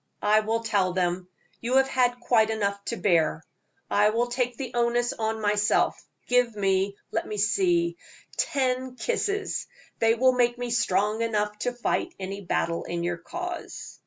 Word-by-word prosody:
"I 210 +1 +5
will 225 +1 -1
tell 200 -5 +1
them. 180 0 -1 0.3
You 245 +2 -1
have 270 0 +5
had 245 -2 +1
quite 230 -2 +3
enough 200 -2 -1
to 235 - -3
bear. 160 -4 +2 0.4
I 210 +1 +4
will 230 +3 +1
take 245 -1 -1
the 260 -3 -5
onus 240 0 +1
on 220 0 -2
myself. 210 0 +1 0.2
Give 245 -2 +2
me 195 0 +1
let - - -2
me 210 - -4
see 345 - +2 0.4
ten 260 -2 0
kisses; 405 - -1 0.3
they 225 0 +4
will 255 +2 +4
make 240 -1 +2
me 245 -1 -4
strong 210 -1 +1
enough 210 -2 0
to 245 - -1
fight 245 -1 -2
any 195 +1 -5
battle 170 -1 -1
in 170 0 -3
your 175 0 -1
cause." 350 - -7
225 Hz, 160 wpm, -26 LUFS, 200-245 Hz, 0.4 s, I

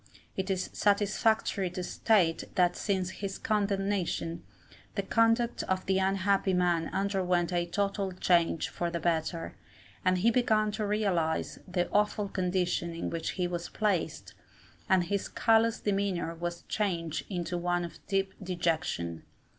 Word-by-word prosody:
It 190 0 -2
is 185 -1 -1
satisfactory 205 -1 +2
to 180 +1 -5
state 175 -4 +2
that 180 -1 +3
since 190 -3 -1
his 195 0 -5
condemnation, 195 -5 -1 0.5
the 200 - 0
conduct 230 +3 +2
of 185 0 -1
the 190 0 +2
unhappy 195 0 +2
man 175 -2 +2
underwent 185 -3 0
a 175 0 +1
total 200 +1 -1
change 175 -3 +2
for 175 - -2
the 170 0 -3
better, 165 0 -1 0.5
and 185 0 +3
he 220 +6 +4
began 220 -3 +2
to 210 0 -2
realize 190 -7 0
the 180 -1 0
awful 210 0 +1
condition 180 -2 -1
in 165 - -3
which 165 -1 -2
he 180 - +1
was 175 -1 -4
placed, 205 -6 -1 0.6
and 190 -2 +5
his 200 +3 -1
callous 225 0 +3
demeanour 195 -4 -1
was 170 +1 -5
changed 170 -7 -2
into 175 -2 -3
one 175 0 0
of 170 - -10
deep 195 -1 0
dejection. 165 - -1
185 Hz, 140 wpm, -30 LUFS, 175-200 Hz, 0.6 s, and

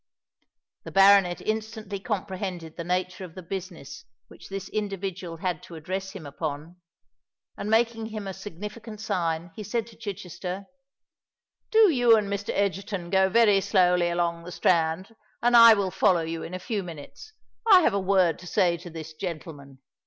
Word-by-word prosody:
The - - -8
baronet 195 -2 +5
instantly 220 -2 -4
comprehended 185 -5 -4
the 170 - -5
nature 180 +2 -2
of 175 -3 -10
the 185 - -8
business 175 -5 -7 0.3
which - - -14
this 195 -1 -5
individual 195 -4 -4
had 180 +1 -2
to 170 - -11
address 190 +4 -5
him 185 -6 -9
upon; 150 +3 -5 0.8
and 205 - -5
making 225 0 +1
him 215 -2 -6
a 195 - -4
significant 210 +4 -8
sign, 170 -5 -2
he - - -7
said 215 +2 -2
to 230 -1 -15
Chichester, 190 -3 -6 1.0
"Do 440 -4 +6
you 245 -5 +5
and 200 -2 -1
Mr. 200 0 -4
Egerton 195 -2 -2
go 190 0 +4
very 210 -2 +4
slowly 180 -3 +3
along 170 -1 -1
the 180 - -9
Strand; 175 +5 +1 0.2
and 240 0 +3
I 230 -1 +10
will 195 -2 -1
follow 180 -4 +3
you 165 0 -4
in 185 - -6
a - - -2
few 205 +3 -3
minutes. 170 - -10 0.4
I 375 -2 +9
have 310 - +2
a 200 - +1
word 185 -4 +2
to 185 - -11
say 175 0 +2
to 175 +1 -10
this 160 -1 -8
gentleman." 150 -5 -8
190 Hz, 165 wpm, -26 LUFS, 170-210 Hz, 1.0 s, I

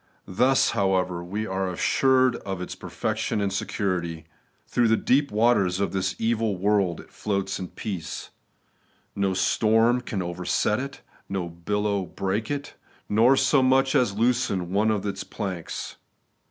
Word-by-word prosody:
Thus, 125 +8 +3
however, 95 -4 0
we 105 +5 -4
axe 95 -2 -2
assured 130 -1 +3
of 95 -2 -5
its 90 - -5
perfection - - -2
and 100 -1 -1
security. 90 -5 -2 0.4
Through 120 -1 +2
the 110 0 +3
deep 140 +2 +2
waters 105 -4 +2
of 100 - 0
this 95 -1 -1
evil 110 -3 0
world 95 -3 +1
it - - -19
floats 100 -2 -2
in 95 - -4
peace. 95 -5 -6 0.8
No 100 -1 0
storm 115 +5 +3
can 100 -6 -3
overset 90 +5 0
it, 135 0 -6 0.3
no 95 -3 -2
billow 100 +4 -1
break 100 +3 -2
it, 145 0 -4 0.3
nor 115 +6 +4
so 140 0 +4
much 130 +1 +3
as 120 -8 +2
loosen 115 -7 +1
one 105 +2 +3
of 105 -2 0
its 95 -1 -3
planks. 95 -6 -5
100 Hz, 145 wpm, -25 LUFS, 95-115 Hz, 0.8 s, nor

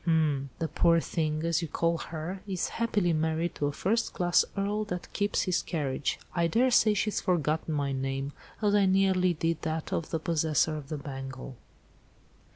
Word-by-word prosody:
"Hm! 155 -5 +2
the 165 - -1
poor 170 +1 +3
thing, 155 -1 -1
as 170 +1 +1
you 165 - -3
call 165 +2 0
her, 165 +4 -5
is 185 -3 -1
happily 205 -7 +1
married 160 +2 0
'to 145 - -1
a - - -1
first 205 +10 0
class 175 -1 +4
Earl, 205 +2 0
that 180 -3 -6
keeps 205 0 +1
his 185 -2 +1
carriage.' 145 -4 -2 0.2
I 170 -1 +2
daresay 230 +2 +4
she's 210 +1 0
forgotten 160 -3 0
my 140 -1 0
name, 135 +1 -2 0.3
as 205 -1 +3
I 205 -2 +4
nearly 185 -2 +3
did 165 +1 -1
that 160 -1 -3
of 165 - -2
the 165 - 0
possessor 160 -2 +1
of 145 -2 -7
the 155 - -3
bangle." 135 -2 -7
165 Hz, 175 wpm, -29 LUFS, 150-185 Hz, 0.3 s, class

